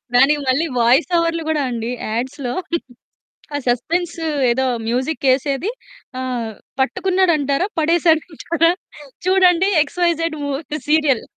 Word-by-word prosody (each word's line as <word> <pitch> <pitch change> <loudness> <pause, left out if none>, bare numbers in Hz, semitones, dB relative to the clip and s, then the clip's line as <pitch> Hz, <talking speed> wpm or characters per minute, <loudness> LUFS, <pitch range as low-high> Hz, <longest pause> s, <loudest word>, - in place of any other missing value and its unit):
దానికి 275 +4 +5
మళ్ళీ 265 +6 +2
వాయిస్ 240 +9 +4
ఓవర్లు 335 0 0
కూడా 310 -2 +1
అండి 235 -1 -3 0.2
యాడ్స్‌లో 245 +3 -3 1.0
ఆ - - +1
సస్పెన్సు 330 +7 -1 0.3
ఏదో 265 +2 +1 0.2
మ్యూజిక్ 260 +6 -1
ఎసేది 280 - -1 0.5
ఆహ్, 245 -3 -3 0.3
పట్టుకున్నాడంటారా? 340 -1 +1
పడేసాడంటారా? 330 0 +2 0.5
చూడండి 370 0 +4
ఎక్స్‌వైజెడ్ 330 0 -1
మూ 285 - -2 0.4
సీరియల్. 300 -6 +3
305 Hz, 100 wpm, -19 LUFS, 260-335 Hz, 1.0 s, దానికి